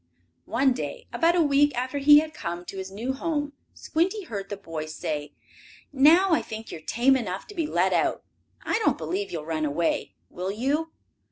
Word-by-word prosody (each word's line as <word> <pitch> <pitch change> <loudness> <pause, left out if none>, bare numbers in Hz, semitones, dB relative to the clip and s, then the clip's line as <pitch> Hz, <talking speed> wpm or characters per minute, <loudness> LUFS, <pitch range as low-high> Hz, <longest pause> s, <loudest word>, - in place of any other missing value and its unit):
One 260 +3 +3
day, - - -5
about 335 +1 +3
a 345 - +4
week 290 -2 +3
after 255 +3 -2
he 295 +1 +8
had 310 0 -7
come 175 +1 -5
to 195 - -8
his 190 0 -5
new 225 +7 -3
home, 290 0 -2 0.2
Squinty 370 +6 -1
heard 200 - -6
the 205 - -4
boy 165 -5 -6
say: 150 -1 -4 0.6
"Now 325 +8 +6
I 325 - +4
think 220 0 -8
you - - -6
are - - -18
tame 245 +10 +3
enough 200 -7 -3
to - - -8
be 330 -6 -1
let - - +1
out. - - +1 0.4
I - - 0
don't 440 - +2
believe 180 +5 -3
you 170 - -3
will 150 - -7
run 160 -1 -2
away, 155 +3 -1
will 180 +2 -5
you? 285 +9 -1
250 Hz, 200 wpm, -26 LUFS, 180-300 Hz, 0.6 s, he